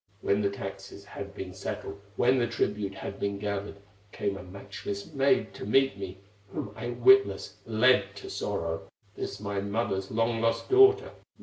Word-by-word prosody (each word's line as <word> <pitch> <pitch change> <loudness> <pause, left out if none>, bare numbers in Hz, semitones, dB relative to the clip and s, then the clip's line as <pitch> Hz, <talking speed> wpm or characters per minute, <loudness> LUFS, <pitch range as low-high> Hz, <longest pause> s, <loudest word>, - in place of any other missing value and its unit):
When 100 +1 +2
the 100 - +2
taxes 100 0 -7
had 100 0 -8
been 95 -2 -6
settled, 100 +1 -5
When 125 +3 +4
the 120 - +2
tribute 105 -3 -1
had 100 - -6
been 100 0 -1
gathered, 100 0 -3 0.4
Came 100 -1 -2
a 100 - -7
matchless 100 +2 -7
maid 135 0 +2
to - - -8
meet 135 +5 +3
me, 95 -1 -6 0.3
Whom 100 +1 -5
I 115 +2 -4
witless 390 - +4
led 110 -3 +4
to - - -9
sorrow, 80 0 -3 0.3
This - - -5
my 100 -1 -2
mother's 100 -2 -1
long 115 +1 +1
lost 115 0 0
daughter. 400 +3 +6
100 Hz, 165 wpm, -29 LUFS, 100-115 Hz, 0.4 s, daughter